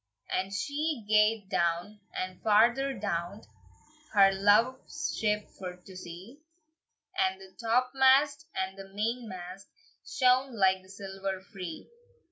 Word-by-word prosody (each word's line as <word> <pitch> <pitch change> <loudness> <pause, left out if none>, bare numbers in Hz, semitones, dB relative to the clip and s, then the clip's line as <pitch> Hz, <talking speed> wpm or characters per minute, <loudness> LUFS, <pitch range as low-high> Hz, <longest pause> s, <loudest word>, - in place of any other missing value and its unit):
And 190 +1 -1
she 285 +3 -2
gaed 210 -1 +3
down, 170 +5 0
and 185 -1 -5
farther 240 +6 +4
down, 195 0 -3 0.7
Her 195 -2 +7
love's 235 +10 +1
ship 210 -1 0
for 180 -1 -7
to 180 +1 -15
see, 185 - -10 0.8
And 190 - +1
the 190 -1 -14
topmast 265 +5 +3
and 190 +1 -3
the 195 0 -10
mainmast 200 -4 -4 0.4
Shone 260 - +2
like 190 -1 +3
the 185 - -20
silver 195 -1 -5
free. 190 -5 -8
205 Hz, 115 wpm, -29 LUFS, 190-250 Hz, 0.8 s, Her